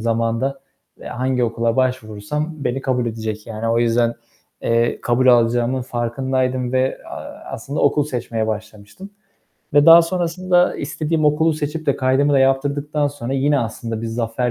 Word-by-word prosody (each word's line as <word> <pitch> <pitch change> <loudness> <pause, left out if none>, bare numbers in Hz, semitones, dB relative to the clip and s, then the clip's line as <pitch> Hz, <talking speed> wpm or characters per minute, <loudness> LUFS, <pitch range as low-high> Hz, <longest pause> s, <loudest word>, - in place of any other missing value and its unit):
zamanda, 115 +4 -1 0.4
eee, - - -11
hangi 125 0 -1
okula 115 0 -1
başvurursam 130 +4 -2
beni 135 +2 -1
kabul 125 -2 -1
edecek 110 -1 -5
yani. 115 0 -4
O 115 +1 +2
yüzden, 120 0 +2 0.5
eee, 115 0 +1
kabul 125 +2 +1
alacağımın 120 +1 +3
farkındaydım 125 +1 -2
ve, 130 0 0
aaa, - - -9
aslında 140 +6 -4
okul 145 +1 +3
seçmeye 120 -5 -3
başlamıştım. 110 - -7 0.6
Ve 145 0 +5
daha 165 +1 +10
sonrasında 180 +1 +1
istediğim 155 +2 -2
okulu 160 +2 +3
seçip 155 +1 -4
de 140 - +2
kaydımı 135 +3 +2
da 140 - +4
yaptırdıktan 145 +2 +1
sonra 135 -2 -6
yine 140 +1 +2
aslında 115 -1 -4
bir - - -3
zafer 115 +2 -2
130 Hz, 150 wpm, -20 LUFS, 115-145 Hz, 0.6 s, daha